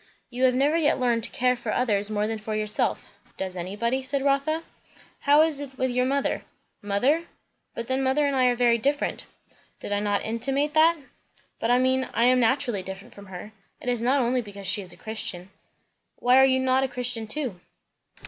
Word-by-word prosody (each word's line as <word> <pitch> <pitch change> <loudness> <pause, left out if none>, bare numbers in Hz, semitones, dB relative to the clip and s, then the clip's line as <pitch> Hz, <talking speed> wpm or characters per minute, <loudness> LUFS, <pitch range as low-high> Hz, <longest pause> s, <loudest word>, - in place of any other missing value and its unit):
"You 250 +1 +1
have 250 -1 +3
never 285 +4 +2
yet 300 -4 +2
learned 240 -2 +1
to - - -7
care 250 0 +1
for 235 -3 -5
others 210 -4 +1
more 210 -1 0
than 220 0 -3
for 215 0 -4
yourself." 215 0 -1 0.3
"Does 190 -1 -3
anybody?" 210 +9 -2
said 275 +1 -1
Rotha. 280 +4 +1 0.6
"How 295 +2 +5
is 315 -3 -1
it 270 -2 -8
with 260 0 0
your 250 +1 +1
mother?" 280 +1 0 0.4
"Mother? 250 +12 +1 0.5
But 235 - -4
then, 260 +1 0
mother 270 +3 +2
and 280 -1 0
I 255 -1 +3
are 245 -1 +3
very 235 -1 +3
different" 285 +5 -1 0.5
"Did - - -7
I 205 - +1
not 205 -1 -1
intimate 270 +6 -1
that?" 325 +2 +5 0.6
"But 225 - -1
I 245 - +5
mean 260 +1 +1
I 230 - +2
am 255 0 +4
naturally 240 -3 +1
different 190 +1 -9
from 200 -1 -13
her. 190 +3 -9 0.3
It 250 - -4
is 245 -2 0
not 260 +3 +2
only 250 +1 +1
because 200 -3 -10
she 195 +2 +1
is 180 -2 -7
a - - -11
Christian." 195 -4 -3 0.6
"Why 250 +1 +3
are 265 - +7
you 260 -1 +3
not 260 0 +2
a - - +1
Christian 245 -3 -2
too?" 245 -7 -4
250 Hz, 205 wpm, -25 LUFS, 215-270 Hz, 0.6 s, are